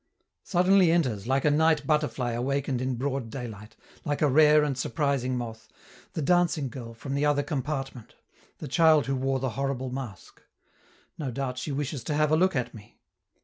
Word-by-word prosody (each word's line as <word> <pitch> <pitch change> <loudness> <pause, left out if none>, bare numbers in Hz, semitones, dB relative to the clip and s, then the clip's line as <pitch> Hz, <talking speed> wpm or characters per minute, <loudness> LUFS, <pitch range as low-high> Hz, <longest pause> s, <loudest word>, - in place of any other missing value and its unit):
Suddenly 185 -1 +4
enters, 125 - 0
like 135 +2 +1
a 150 - +4
night 155 -1 +3
butterfly 150 -5 0
awakened 130 +2 -1
in 130 0 -1
broad 130 -1 -3
daylight, 110 -4 -8 0.3
like 145 +1 -1
a - - +5
rare 150 +2 +5
and 145 -2 -1
surprising 135 -2 -1
moth, 115 -2 -6 0.5
the 160 - -3
dancing 170 -3 +2
girl 115 -2 -9
from 135 +4 -6
the 140 +1 0
other 145 -1 +2
compartment, 135 -4 -4 0.4
the - - -7
child 160 0 +4
who 135 - -1
wore 135 +1 0
the 130 0 -2
horrible 130 0 -3
mask. 125 -7 -8 0.8
No 145 -4 -3
doubt 125 0 -3
she 145 - -4
wishes 140 -2 -3
to 150 - -1
have 150 0 +2
a - - +5
look 185 +2 +2
at 125 -2 -2
me. 105 -2 -14
135 Hz, 180 wpm, -27 LUFS, 125-150 Hz, 0.8 s, a